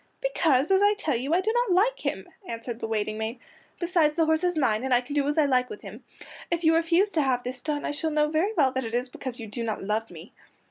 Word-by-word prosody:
"Because, 325 - +1
as 385 0 +4
I 410 +1 +4
tell 310 -9 -1
you, 260 +5 -3
I 365 - +3
do 435 +4 0
not 480 -5 +2
like - - +2
him," - - -3 0.2
answered 230 0 -5
the 225 - -3
waiting 215 -1 -2
maid. 225 +3 -4 0.4
"Besides 335 -4 +2
the 330 -1 +3
horse 315 +2 +1
is 355 -2 +1
mine, 230 -6 +1
and 265 -1 +2
I - - +5
can 260 +3 -8
do 285 -1 +1
as 295 - -1
I 310 - +5
like 255 -2 +2
with 420 - -9
him. - - -10 0.5
If 345 0 -1
you 320 0 +5
refuse 335 +5 +2
to 320 - +1
have 255 -3 0
this 250 0 -4
done 295 -2 -2
I - - -1
shall 290 +2 -2
know 300 -1 +2
very 320 +7 +1
well 270 -4 +4
that 260 0 -2
it 225 0 -4
is 250 +1 -1
because 250 -1 -7
you 225 - -6
do 225 +3 -4
not 220 -3 -3
love 215 +3 -2
me." 170 +2 -12
290 Hz, 275 wpm, -26 LUFS, 245-335 Hz, 0.5 s, I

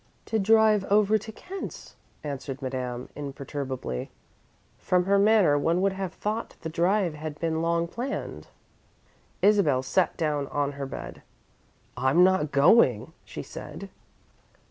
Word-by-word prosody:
"To 220 - -1
drive 215 0 +4
over 210 +1 +3
to 220 +2 -9
Kent's," 375 - -8 0.3
answered 140 -2 -5
Madame, 125 -2 -4
imperturbably. 135 - -5 0.7
From 180 -1 +1
her 200 +1 +3
manner 200 -8 +4
one 165 +4 +1
would 195 -1 +2
have 190 -2 -4
thought 215 +2 -3
the 160 - -4
drive 175 +2 +1
had 150 0 -7
been 160 -1 -1
long 170 0 +1
planned. 250 +10 -5 1.0
Isabel 190 -11 +4
sat 175 +7 +1
down 150 -3 -1
on 145 0 -1
her 140 -1 -5
bed. - - -8 0.7
"I'm 135 +7 +4
not 185 -5 +3
going," 140 - +4
she - - -7
said. - - -9
165 Hz, 130 wpm, -26 LUFS, 140-200 Hz, 1.0 s, drive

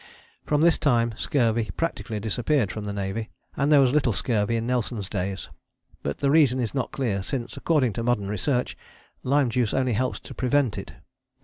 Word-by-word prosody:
From 150 0 +2
this 170 0 +4
time 120 -5 +2
scurvy 115 -3 +1
practically 130 -9 -2
disappeared 115 +2 0
from 105 -1 -5
the 100 - -3
Navy, 100 +3 -3 0.3
and 140 +2 +1
there 145 - +7
was 130 -2 +4
little 135 -5 +2
scurvy 105 +3 0
in 115 0 -1
Nelson's 120 -4 -2
days; 95 -1 -3 0.5
but 70 - -3
the 140 - +1
reason 140 -5 +4
is 115 -4 -2
not 130 -4 -2
clear, 110 -8 -1
since, 120 +4 -4
according 140 -9 +1
to 115 - -3
modern 115 -5 0
research, 125 +6 -1 0.5
lime 135 -1 +2
juice 120 -2 0
only 130 -2 +1
helps 130 +4 -1
to - - -10
prevent 130 -3 +1
it. - - -9
120 Hz, 185 wpm, -25 LUFS, 105-135 Hz, 0.5 s, there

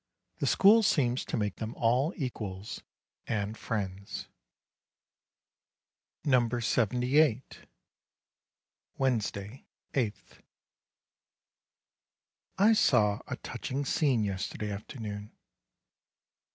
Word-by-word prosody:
The - - 0
school 215 +4 +6
seems 130 - +2
to - - -2
make 105 -3 -1
them 110 +1 -5
all 125 +7 +2
equals 105 - -5 0.5
and 105 -1 -1
friends. 100 -4 -4 2.0
NUMBER 120 -4 +3
78 125 +4 +1 1.3
Wednesday, 115 -3 -2 0.3
8th. 115 -6 -3 2.2
I 210 +4 +6
saw 105 - +3
a - - -3
touching 140 +2 -4
scene 135 -5 +2
yesterday 100 +1 -3
afternoon. 105 0 -6
115 Hz, 75 wpm, -30 LUFS, 105-135 Hz, 2.2 s, school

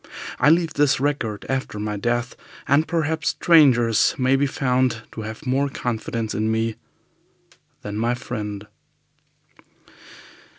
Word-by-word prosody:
I - - +5
leave 165 -1 +3
this 140 -2 +2
record 130 -7 -2
after 130 -5 -3
my 105 0 -3
death, 120 +4 -2 0.3
and 145 +4 +3
perhaps 160 -1 0
strangers 125 -9 +4
may 130 +1 +3
be 140 +1 +2
found 125 -4 0
to 110 - -7
have 110 +6 -8
more 135 +2 +1
confidence 115 -3 -3
in 110 +1 0
me 110 0 0 1.1
than 105 0 -5
my 120 +2 0
friend." 105 -4 -6
125 Hz, 125 wpm, -22 LUFS, 110-140 Hz, 1.1 s, I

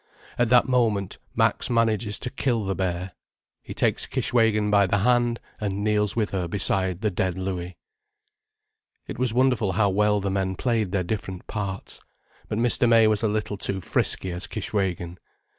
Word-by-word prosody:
At 120 -2 +3
that 125 +1 +5
moment 115 -7 0 0.2
Max - - +1
manages 115 -3 +1
to 125 - -5
kill 120 -6 -1
the 95 - -1
bear—he 90 -1 -6
takes - - 0
Kishwégin 110 -3 +1
by 100 -1 +4
the 100 - +1
hand 120 +2 +2 0.2
and 100 -1 -2
kneels 105 -1 +1
with 110 -3 0
her 90 -3 -2
beside 95 0 0
the 105 -2 0
dead 95 0 -1
Louis. 90 -2 -4 1.3
It - - -7
was 125 -2 +1
wonderful 125 -5 +2
how 100 +1 +2
well 105 +1 +2
the 100 0 -2
men 95 -1 -1
played 110 -4 0
their 95 -2 0
different 95 -1 -5
parts. 100 -3 -5 0.5
But 105 - -3
Mr. 120 +1 +3
May 115 -1 +6
was 110 -1 +2
a 115 - +2
little 105 -1 -2
too 95 0 -2
frisky 95 0 0
as 90 +2 -4
Kishwégin. 90 -5 -3
105 Hz, 165 wpm, -25 LUFS, 95-115 Hz, 1.3 s, May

